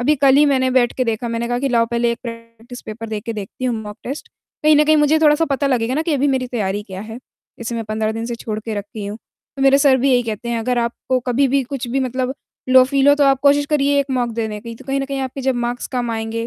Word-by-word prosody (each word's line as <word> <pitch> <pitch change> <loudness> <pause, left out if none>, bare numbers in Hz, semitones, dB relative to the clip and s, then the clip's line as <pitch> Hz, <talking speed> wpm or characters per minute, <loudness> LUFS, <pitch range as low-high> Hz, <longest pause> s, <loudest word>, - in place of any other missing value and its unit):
अभी 295 +5 +3
कल 270 -1 +4
ही 295 - +6
मैंने 260 -2 +2
बैठ 250 -2 +3
के 255 - +1
देखा, 230 0 -2
मैंने 230 +1 -2
कहा 245 - 0
कि 275 +2 -1
लाओ 230 -2 +2
पहले 235 0 +1
एक 235 - -6
प्रैक्टिस 230 0 -10
पेपर 220 +1 -7
दे 215 -1 -3
के 230 +1 -5
देखती 215 +4 -7
हूँ, 245 -2 +1
मॉक 210 -1 -8
टेस्ट, 275 +4 -6 0.3
कहीं 305 0 +5
न 300 - +5
कहीं 310 0 +4
मुझे 295 +1 +4
थोड़ा-सा 310 +1 +4
पता 280 -1 -1
लगेगा 250 -1 0
ना 310 - 0
कि 325 -2 -1
अभी 280 0 +1
मेरी 260 -2 0
तैयारी 205 -4 -2
क्या 190 -2 -8
है? 220 +3 -8 0.4
इसे 235 0 -4
मैं 225 -1 -3
15 215 +1 -2
दिन 225 +1 -4
से 235 - -3
छोड़ 215 -2 -5
के 220 0 -5
रखी 205 0 -6
हूँ, 205 +1 -5 0.4
तो 270 - -2
मेरे 275 0 +5
सर 275 -2 +5
भी 265 +2 +1
यही 245 -1 +4
कहते 230 0 -5
हैं, 235 - -1
"अगर 245 +2 -1
आपको 240 +2 -1
कभी 275 +3 +3
भी 275 +1 +2
कुछ 260 0 -5
भी 270 +3 0
मतलब 255 +1 -2 0.3
लो 260 0 +7
फील 275 +1 +2
हो, 285 - +7
तो 290 -1 +2
आप 270 -1 +4
कोशिश 285 0 +4
करिए 285 -1 +2
1 280 - -3
मॉक 245 -2 0
देने 220 -2 -3
की, 230 0 -8
तो - - -14
कहीं 275 0 -1
न - - -1
कहीं 275 0 -4
आपके 265 +1 -4
जब 265 0 0
मार्क्स 240 +1 -3
कम 240 -1 -1
आएँगे, 225 0 -3
245 Hz, 285 wpm, -19 LUFS, 230-275 Hz, 0.4 s, लो